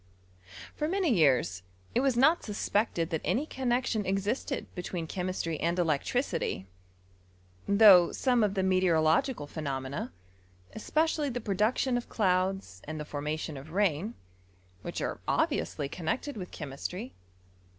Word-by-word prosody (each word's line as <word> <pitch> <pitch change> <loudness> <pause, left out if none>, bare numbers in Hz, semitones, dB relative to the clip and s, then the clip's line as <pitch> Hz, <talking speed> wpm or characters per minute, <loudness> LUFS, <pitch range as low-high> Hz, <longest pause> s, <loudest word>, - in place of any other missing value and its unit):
For 300 - -2
iBany 360 - +2
years 130 - +3 0.3
it - - +2
was 265 -2 +2
not 310 +7 +5
suspected 205 -5 -1
that 160 - -1
any 275 +6 0
connexion 245 -5 0
eadsted 200 +8 -1
betweea 175 -2 -4
chemistry 180 -3 -3
and 170 +2 0
electricity; 165 - 0 1.0
though 200 -4 +7
some 245 -4 +2
of 205 -1 +1
the 190 - +1
meteorological 180 - +2
phenomena, 140 -3 -4 0.6
especiaUy 305 +4 0
the 245 - -3
production 220 +4 +1
of 245 - -6
elouds 185 - 0
and 155 +1 -5
the 150 - -5
formation 150 +1 -4
of 150 +4 -10
rain, 200 +2 +1 0.7
vhich - - -3
are - - -4
obviously 140 - 0
connected 180 - -3
with 185 -4 -6
chemistry, 175 - -6
seem? - - -30
190 Hz, 130 wpm, -29 LUFS, 155-240 Hz, 1.0 s, though